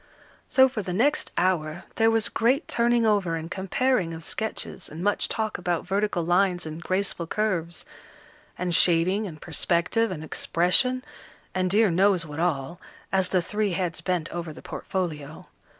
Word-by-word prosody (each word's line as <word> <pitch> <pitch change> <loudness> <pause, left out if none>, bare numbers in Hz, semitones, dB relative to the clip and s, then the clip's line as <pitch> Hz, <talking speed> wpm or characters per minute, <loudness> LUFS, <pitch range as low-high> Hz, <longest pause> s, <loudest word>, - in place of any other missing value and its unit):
So 260 0 +6
for 250 -4 -4
the 180 -2 -4
next 280 +10 +1
hour, 175 -3 0
there 225 0 +4
was 225 -1 +2
great 255 +7 +1
turning 235 0 +2
over 200 -6 +2
and 165 +1 -6
comparing 195 -2 0
of 160 - -9
sketches, 220 +5 -3
and 160 +3 -7
much 205 0 0
talk 215 -4 -2
about 175 -2 -1
vertical 200 -3 0
lines 180 0 +2
and 155 +1 -6
graceful 185 -2 -2
curves, 175 -5 -2 0.7
and 180 -1 -2
shading 185 +4 +3
and 155 -4 -9
perspective, 175 +8 0
and 160 -4 -5
expression, 185 +11 +1 0.5
and 185 0 0
dear 210 +1 +4
knows 185 0 +3
what 150 0 -7
all, 165 -1 -1 0.3
as 190 -1 +2
the 185 -2 +1
three 210 +1 -1
heads 170 -2 -2
bent 175 -2 -1
over 170 -2 -5
the 150 - -12
portfolio. 155 -5 -4
185 Hz, 160 wpm, -26 LUFS, 170-210 Hz, 0.7 s, So